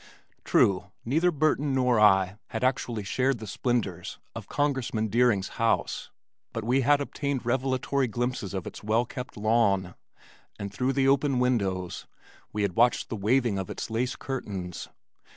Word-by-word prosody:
True, 95 0 +3 0.2
neither 160 +9 +3
Burton 150 -3 +1
nor 125 -3 +3
I 95 -1 +4
had 110 - -4
actually 125 -4 0
shared 130 +6 +1
the 110 - -8
splendors 100 -5 -2 0.2
of - - -8
Congressman 130 -6 0
Deering's 115 -4 +2
house 115 0 0 0.4
but 115 - -3
we 125 +4 +2
had 145 +3 +4
obtained 140 -2 -3
revelatory 130 +2 0
glimpses 120 -4 -3
of 95 - -3
its - - -8
well 110 +3 +2
kept 125 -1 -7
lawn, 105 -4 +2 0.6
and 100 -1 -6
through 130 +5 0
the 135 0 +2
open 140 0 +3
windows 100 -8 -1 0.4
we 105 - -1
had 95 -4 -1
watched 120 +1 +3
the - - -3
waving 110 0 +1
of 95 - -5
its - - -5
lace 125 +3 -1
curtains. 95 -10 -5
120 Hz, 150 wpm, -27 LUFS, 100-130 Hz, 0.6 s, I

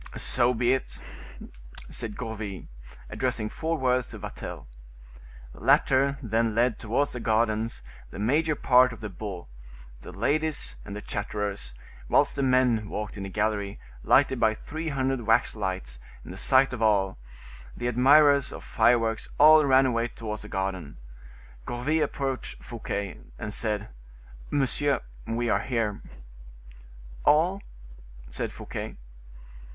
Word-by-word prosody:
"So 125 0 +2
be 120 +2 +2
it," 130 - -3 0.9
said 110 -3 -3
Gourville, 110 -6 -5 0.5
addressing 125 -4 -1
four 165 +5 -2
words 125 -2 +1
to 110 - -9
Vatel. 105 0 -7 0.9
The - - -14
latter 135 +2 +3
then 115 -1 0
led 120 +1 +2
towards 120 +6 0
the 120 - -5
gardens 110 - 0 0.3
the - - -10
major 150 +9 +1
part 125 -2 +4
of 115 - -12
the 105 -2 -5
beaux, 95 -3 -7 0.5
the - - -9
ladies 150 +8 0
and 100 - -8
the 105 - -7
chatterers, 100 - -4 0.3
whilst 145 - +3
the 140 - -1
men 125 -5 +2
walked 105 0 -4
in 100 - -7
the 100 - -5
gallery, 105 0 -1 0.2
lighted - - +4
by 110 0 +3
three 160 +7 -6
hundred 135 -3 -1
wax 115 0 +2
lights, 95 - -4 0.3
in - - -9
the - - -8
sight 130 0 +4
of 120 - -5
all; 100 - +2 0.6
the - - -4
admirers 140 +3 +5
of - - -8
fireworks 115 -2 +2
all 155 +1 +8
ran 135 -1 +5
away 120 -2 +1
towards 110 -3 -6
the 105 - -9
garden. 95 -7 -4 0.7
Gourville 145 +7 0
approached 135 -2 -4
Fouquet, 100 -4 -5 0.2
and 105 - -5
said: 105 -1 -1 0.6
"Monsieur, 145 +1 +1 0.3
we 120 +1 -1
are - - +2
here." 115 -5 -2 1.2
"All?" 175 +6 +3 0.7
said - - -3
Fouquet. - - -7
115 Hz, 135 wpm, -27 LUFS, 105-135 Hz, 1.2 s, all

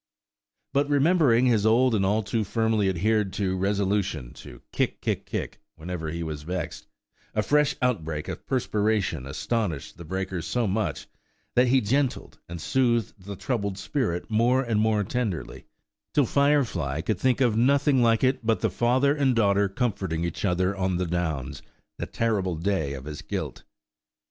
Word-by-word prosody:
But 140 +1 +2
remembering 145 -4 +4
his 115 -5 +3
old 115 +3 +4
and 100 -3 +2
all 105 +3 +1
too 110 +2 -1
firmly 110 -1 +1
adhered 105 +2 +1
to 95 -2 -1
resolution 95 -8 -1
to - - -12
kick, - - -1
kick, - - -2
kick, - - -4
whenever 80 0 -5
he 85 +1 -4
was 80 -2 -5
vexed, 90 +3 -5 0.5
a 105 - +2
fresh 150 +5 +2
outbreak 80 -11 -1
of - - -7
perspiration 105 - 0
astonished 80 - -3
the - - -7
breaker 95 +1 -3
so 100 +10 -1
much, 95 -8 -1 0.5
that 125 +1 +4
he 130 +1 +4
"gentled" 130 +4 -1
and 85 0 -6
soothed 120 +2 +1
the 100 0 -6
troubled 100 -3 -2
spirit 105 - -2
more 120 +4 +2
and 115 -4 +1
more 110 -1 +2
tenderly, 95 - -3 0.5
till 145 - +4
Firefly 120 - +1
could 95 +1 -2
think 130 +4 +2
of 120 -5 +3
nothing 140 +3 +3
like 115 0 +3
it 130 -1 +2
but 115 0 +1
the 110 - +1
father 125 +8 +2
and 135 -4 +2
daughter 100 -2 +3
comforting 95 -7 -2
each 85 -2 -4
other 95 0 +1
on 95 -2 0
the 90 - -1
Downs, 80 -6 -3 0.4
that - - -5
terrible 100 -6 0
day 80 -4 -1
of 65 -1 -7
his 75 0 -6
guilt. - - -5
105 Hz, 165 wpm, -26 LUFS, 90-120 Hz, 0.5 s, remembering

